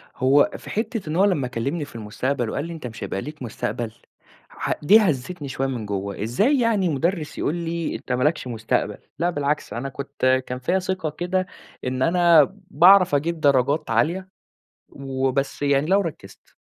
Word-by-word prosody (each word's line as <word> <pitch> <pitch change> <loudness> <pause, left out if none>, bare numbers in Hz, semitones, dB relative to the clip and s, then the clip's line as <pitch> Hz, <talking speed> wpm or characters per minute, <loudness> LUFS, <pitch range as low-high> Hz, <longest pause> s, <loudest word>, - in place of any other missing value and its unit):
هو 135 +3 +4
في - - -12
حِتّة 220 -5 -3
إن 155 - -2
هو 190 +3 +4
لما 150 -10 +1
كلّمني 135 +6 -3
في - - -16
المستقبل 115 +3 -2
وقال 140 - -3
لي: 170 - -6
"أنت 155 -6 -6
مش 115 -2 -8
هيبقى 95 - -3
ليك 150 0 -9
مستقبل." 115 0 -4 0.6
ح - - -4
دي 205 +9 +7
هزّتني 155 - -1
شوية 135 0 -2
من 125 -5 -4
جوّه، 100 -1 -4
إزاي 210 - +2
يعني 220 -6 +2
مُدرِّس 160 +2 -1
يقول 155 - -1
لي 170 -1 -3
أنت - - -7
ما 125 0 +1
لكش 150 -3 +1
مستقبل، 115 -2 -1 0.2
لأ 170 +2 +2
بالعكس 145 -2 -2
أنا 130 +4 -4
كنت 130 -1 0
كان 125 0 -4
فيا 175 +9 +1
ثِقة 185 -3 -2
كده 180 +4 -2 0.4
إن 130 0 -2
أنا 170 0 +6 0.3
باعرف 180 +2 +6
أجيب 160 +4 -1
درجات 140 +2 +2
عالية 170 +12 +1 0.6
وبس 135 0 -2
يعني 140 0 +2
لو 195 +4 +4
ركزت 145 - -8
145 Hz, 175 wpm, -23 LUFS, 130-175 Hz, 0.6 s, دي